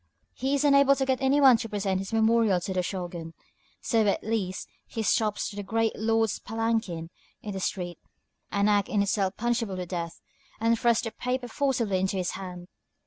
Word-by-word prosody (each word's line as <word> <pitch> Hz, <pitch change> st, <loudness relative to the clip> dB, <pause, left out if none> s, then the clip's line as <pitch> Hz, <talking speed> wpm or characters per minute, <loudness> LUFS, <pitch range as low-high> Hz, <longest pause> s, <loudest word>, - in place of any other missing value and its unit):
He 270 Hz, +2 st, -1 dB
is 280 Hz, -, +1 dB
unable 280 Hz, -1 st, +5 dB
to 270 Hz, -, 0 dB
get 260 Hz, -1 st, 0 dB
any 270 Hz, +2 st, +3 dB
one 265 Hz, -4 st, +7 dB
to 225 Hz, 0 st, -5 dB
present 195 Hz, -2 st, -1 dB
his 195 Hz, -, -6 dB
memorial 225 Hz, -3 st, +3 dB
to 190 Hz, -, -3 dB
the 185 Hz, -, 0 dB
Shōgun, 175 Hz, -3 st, -4 dB, 0.5 s
so 225 Hz, -2 st, +2 dB
at 200 Hz, -, +1 dB
last 205 Hz, -4 st, -2 dB, 0.2 s
he 225 Hz, -, -4 dB
stops 215 Hz, -1 st, +1 dB
the 205 Hz, 0 st, -5 dB
great 225 Hz, +2 st, 0 dB
lord's 225 Hz, -1 st, +1 dB
palanquin 220 Hz, -7 st, -2 dB, 0.3 s
in 210 Hz, -, -5 dB
the 195 Hz, -, -4 dB
street, 175 Hz, -2 st, -3 dB, 0.5 s
an 200 Hz, 0 st, +2 dB
act 205 Hz, -1 st, +2 dB
in 205 Hz, -2 st, +2 dB
itself 195 Hz, -1 st, 0 dB
punishable 230 Hz, -4 st, -1 dB
with 180 Hz, -1 st, -5 dB
death, 170 Hz, -2 st, -4 dB, 0.4 s
and 230 Hz, +1 st, +3 dB
thrusts 235 Hz, -1 st, +3 dB
the 225 Hz, -, -3 dB
paper 250 Hz, +1 st, -3 dB
forcibly 235 Hz, -7 st, 0 dB
into 190 Hz, +1 st, 0 dB
his 180 Hz, -2 st, -1 dB
hand. 180 Hz, -2 st, -7 dB
215 Hz, 190 wpm, -27 LUFS, 190-230 Hz, 0.5 s, one